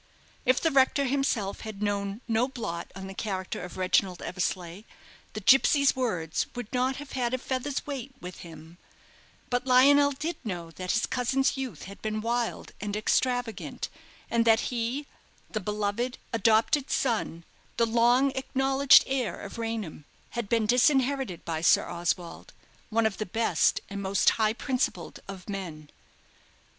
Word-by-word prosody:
If 255 0 +4
the 325 - +1
rector 275 +1 +3
himself 255 -7 0
had 215 -2 -6
known 200 +1 -2
no 230 +2 +2
blot 175 -10 -5
on 195 0 -7
the 190 - -7
character 190 -2 -4
of 180 - -8
Reginald 185 0 +1
Eversleigh, 180 0 -3 0.5
the 215 - -5
gipsy's 270 +5 +5
words 180 -11 -1
would 245 -3 -6
not 255 +1 +1
have 285 0 -9
had 250 -1 0
a - - -2
feather's 265 +2 -3
weight 275 -2 -5
with 180 0 -8
him; 165 0 -12 0.7
but 245 +1 0
Lionel 285 +3 +6
did 305 +5 -4
know 175 -6 -5
that 185 +2 -3
his 220 - +2
cousin's 265 +2 +1
youth 255 - -5
had 200 +1 -10
been 215 0 -2
wild 235 +1 -2
and 205 0 -3
extravagant, 245 +1 -1 0.4
and 235 0 +3
that 225 +1 +3
he, 245 +5 -2 0.5
the 215 - -1
beloved, 210 +5 -2 0.2
adopted 230 +6 +3
son, 220 -9 -1 0.3
the 230 - +4
long 240 +4 +3
acknowledged 270 +1 +4
heir 255 -9 -2
of 200 +3 -8
Raynham, 225 -10 -4 0.3
had 235 -4 -4
been 230 -2 +2
disinherited 255 - +2
by 160 -1 -2
Sir 170 - +4
Oswald 175 0 -3 0.4
one 230 0 +2
of 220 -3 -1
the 215 - -3
best 225 +5 +2
and 200 0 -5
most 195 0 +3
high 215 -1 +1
principled 255 +2 -2
of 195 -2 -9
men. 170 -7 -6
230 Hz, 150 wpm, -28 LUFS, 195-260 Hz, 0.7 s, Lionel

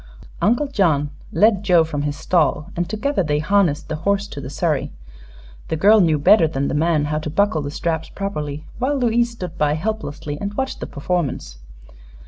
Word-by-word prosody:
Uncle 240 +7 +2
John 160 - +1 0.2
led 210 -2 +3
Joe 180 -4 +5
from 150 -2 -3
his 145 0 -3
stall 160 0 +1
and 175 +1 -2
together 225 +5 0
they 150 -4 0
harnessed 165 -1 +1
the 155 - -3
horse 200 +5 0
to 140 - -7
the 135 - -7
surrey. 150 -1 -1 0.8
The - - -1
girl 205 +6 +5
knew 160 -4 +3
better 160 +4 +5
than 140 -2 -2
the - - -2
man 155 0 +2
how 150 +1 -1
to 155 - -5
buckle 200 0 +1
the 145 - -4
straps 160 +2 -3
properly, 150 -6 -5
while 275 +3 0
Louise 240 -1 +2
stood 185 -8 -8
by 150 -1 +2
helplessly 155 -6 -4
and 205 0 -4
watched 265 +2 -3
the - - -5
performance. 140 - -3
165 Hz, 185 wpm, -21 LUFS, 150-205 Hz, 0.8 s, Joe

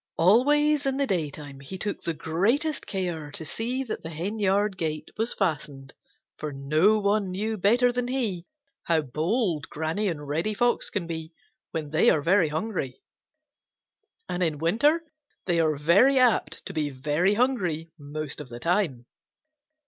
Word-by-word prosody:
Always 290 - +4
in 270 0 0
the 280 - +2
daytime 150 - -3
he 140 +8 -7
took 205 +2 -3
the 165 - -3
greatest 220 - 0
care 175 -6 -3
to 160 - -6
see 245 - -2
that 235 - -5
the 160 - -7
henyard 200 +4 0
gate 155 -3 -3
was 225 +2 -1
fastened, 145 -7 -2 0.4
for 150 - -4
no 155 +10 +3
one 205 -1 +1
knew 210 +4 -2
better 235 +5 +3
than 245 0 -2
he 225 -9 -2 0.4
how 165 -2 +3
bold 160 - -1
Granny 160 +7 -2
and 150 -5 -3
Reddy 165 +9 -1
Fox 240 +3 +1
can 200 -5 -2
be 160 -1 -6 0.4
when 155 -3 -4
they 155 - +4
are 150 - +2
very 180 -1 +4
hungry, 155 - -3 1.3
and 180 - -3
in 160 -4 +1
winter 235 - +2 0.4
they 175 -2 +1
are 155 -2 +2
very 185 - +4
apt 250 -3 +2
to - - -6
be 150 -2 -1
very 150 +9 +1
hungry 180 -10 0
most 150 +1 -5
of 140 - -10
the 120 0 -8
time. 165 -7 0
175 Hz, 155 wpm, -26 LUFS, 155-215 Hz, 1.3 s, Always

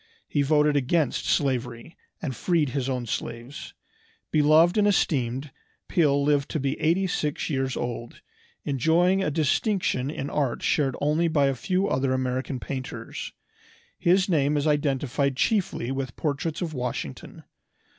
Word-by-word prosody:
He 145 - 0
voted 150 +1 +3
against 145 +1 +1
slavery, 125 +1 -1 0.3
and 135 -5 -3
freed 165 -2 +1
his 135 0 -2
own 125 -2 -2
slaves. 120 +4 -6 0.6
Beloved 155 +4 +5
and 205 - +4
esteemed, 135 - 0 0.4
Peale 145 -4 +2
lived 145 0 +2
to 155 - -2
be 135 0 0
eighty 170 +5 +2
six 150 -3 -2
years 135 -2 -1
old, 120 -1 -5 0.4
enjoying 165 +7 +2
a - - +1
distinction 155 - 0
in 140 -2 -4
art 140 -5 -1
shared 135 -4 +1
only 155 +4 +2
by 150 -4 +2
a - - 0
few 185 +9 0
other 130 -4 +1
American 130 0 -2
painters. 130 0 -6 0.7
His 185 +2 +3
name 150 -4 +2
is 145 - 0
identified 140 -2 0
chiefly 185 - 0
with 135 -2 -4
portraits 155 +3 -2
of 165 -2 -4
Washington. 125 - -5
145 Hz, 140 wpm, -26 LUFS, 130-160 Hz, 0.7 s, Beloved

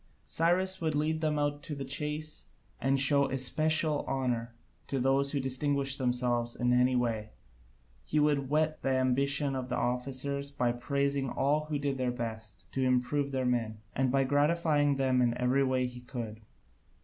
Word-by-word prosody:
Cyrus 185 +3 +2
would 160 -2 0
lead 155 +2 0
them 155 -1 0
out 145 0 -1
to 150 0 -6
the 140 -1 -5
chase, 150 +3 -3 0.3
and 135 +2 +1
show 140 +1 +5
especial 155 +3 +3
honour 125 -3 -2 0.3
to 135 - -2
those 135 +2 +2
who 145 - -1
distinguished 135 +1 0
themselves 125 -2 0
in 125 0 +1
any 125 +1 +3
way: 115 -3 -1 0.7
he 155 - 0
would 145 -3 +1
whet 155 +1 0
the - - -1
ambition 140 +2 +1
of 130 -1 -4
the 125 - -1
officers 135 +3 -1
by 125 -4 0
praising 140 +2 -1
all 150 +4 0
who 155 -1 -2
did 140 -2 -2
their 130 -1 0
best 110 -5 -6
to 135 - -2
improve 130 +3 +1
their 130 -1 -1
men, 115 -3 -1 0.2
and 130 -1 +1
by 135 0 +3
gratifying 145 +1 +2
them 130 -2 +1
in 120 -1 +1
every 125 +2 +2
way 130 -1 +1
he 125 0 -7
could. 115 -3 -7
135 Hz, 170 wpm, -30 LUFS, 125-145 Hz, 0.7 s, show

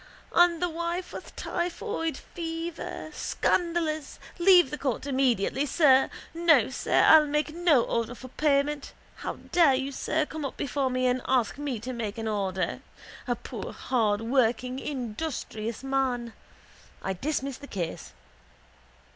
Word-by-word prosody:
—And 345 -1 +5
the - - +3
wife 340 +2 -3
with - - -9
typhoid 345 -1 -3
fever! 330 -1 -6
Scandalous! 330 -4 -1 0.2
Leave 355 -5 +6
the 295 - -3
court 265 -3 -2
immediately, 265 -1 +1
sir. 270 -4 +5 0.2
No, 325 -7 +4
sir, - - +2
I'll 310 -1 +8
make 300 +1 0
no 330 -7 +4
order 230 +1 -2
for 255 +1 -10
payment. 285 +1 0 0.2
How - - -4 0.2
dare 325 -7 +5
you, 270 +1 -2
sir, 310 +3 -1
come 310 0 -6
up 275 - -4
before 275 0 -1
me 255 0 0
and 250 0 +2
ask 255 0 +1
me 280 -6 -3
to 255 +2 -5
make 225 -3 -4
an 225 -1 -3
order! 195 -3 -1 0.5
A - - +1
poor - - -7
hardworking 240 +2 +1
industrious 245 -4 -4
man! 260 -4 -1 0.7
I 190 - -1
dismiss 275 - -2
the 285 - -10
case. 165 - -5
275 Hz, 140 wpm, -27 LUFS, 245-315 Hz, 0.7 s, I'll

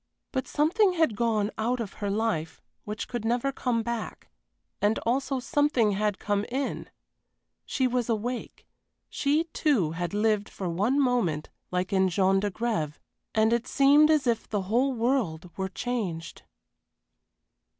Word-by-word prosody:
But 260 -1 -2
something 365 +6 +3
had 320 -10 +2
gone 215 -1 +1
out 240 +3 0
of 215 -5 -4
her 205 - -1
life 200 -7 -1 0.3
which 210 +1 -4
could 240 -3 -4
never 240 +4 +1
come 245 -4 -1
back, 235 -1 -5 0.5
and 205 +2 +3
also 265 +3 0
something 270 -5 +2
had 205 0 0
come 205 -1 -1
in. 270 +3 -3 0.8
She 260 - 0
was 250 -1 0
awake 235 +2 -3 0.5
she, 295 +3 +1
too, 235 - +2
had 175 +3 -3
lived 210 -1 +1
for 190 - -5
one 205 +11 +1
moment 235 - +1 0.2
like 180 +2 -2
in 190 -1 +3
Jean 190 +2 +3
d'Agrève 205 -6 -1 0.4
and 220 +1 +4
it 235 +1 0
seemed 285 +3 +5
as 305 -3 +3
if 235 -2 0
the 205 -3 -1
whole 240 +8 +2
world 220 -9 -1
were 190 0 -2
changed. 185 -7 -4
225 Hz, 145 wpm, -27 LUFS, 200-255 Hz, 0.8 s, seemed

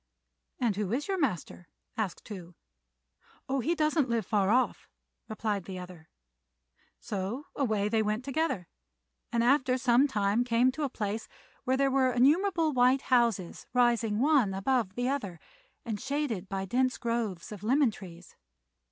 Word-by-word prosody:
"And 225 -6 0
who 205 -2 -2
is 280 +4 -1
your 385 -1 -1
master?" 180 - -2 0.3
asked 215 -5 -3
Tou. 180 -5 -9 0.9
"Oh, 270 +1 0
he 325 +8 0
doesn't 305 -3 +1
live 230 -3 0
far 200 -1 +1
off," 250 +4 +1 0.4
replied 215 -3 -2
the 190 0 -6
other; 180 -3 -10 0.9
so 205 +8 -4
away 215 -7 0
they 220 +1 +1
went 215 +3 -1
together, 275 - -1 0.6
and 235 -1 +1
after 260 0 +3
some 255 +2 +4
time 210 -2 +1
came 245 +1 +3
to 310 - -7
a 285 - 0
place 215 -2 -4 0.4
where 260 +1 +2
there 275 0 +2
were 260 -1 +3
innumerable 320 +5 +3
white 255 +1 +4
houses 230 -8 +1
rising 235 -3 +3
one 260 -6 +3
above 205 -1 0
the 245 +1 -1
other, 205 - -3 0.5
and 220 -4 -4
shaded 265 -9 -2
by 195 0 -3
dense 255 +6 +1
groves 230 -7 -3
of 205 -3 -8
lemon 255 +3 +3
trees. 180 -4 -12
235 Hz, 150 wpm, -29 LUFS, 200-265 Hz, 0.9 s, some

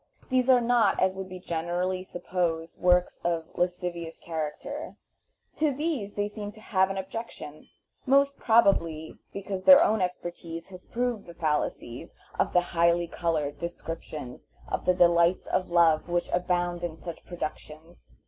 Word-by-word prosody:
These 255 -1 +2
are 250 -2 +7
not, 235 -3 +3
as 185 0 +3
would 190 0 -6
be 185 - -7
generally 175 +2 -2
supposed, 175 -3 -3
works 180 0 +3
of 170 -2 0
lascivious 175 -2 -2
character; 160 - -5 0.6
to 305 -1 +2
these 275 -8 -2
they 205 0 0
seem 205 0 -6
to 220 - -15
have 190 -3 +1
an 195 - -3
objection, 190 -6 -7 0.4
most 280 +1 +3
probably 170 -9 +2
because 195 -1 -5
their 280 - +9
own 220 - +2
experience 175 -2 -4
has 185 -1 -12
proved 240 -4 -2
the 170 - -11
fallacies 150 -3 -2 0.2
of - - +2
the 180 - +4
highly 170 0 +2
colored 155 -4 -2
descriptions 165 -6 -7 0.2
of - - -3
the 180 - +4
delights 170 0 +4
of 185 - -1
love 170 -2 +4
which 175 0 0
abound 175 -1 0
in 165 -2 -4
such 170 -1 -8
productions. 160 -1 -8
175 Hz, 150 wpm, -27 LUFS, 170-200 Hz, 0.6 s, their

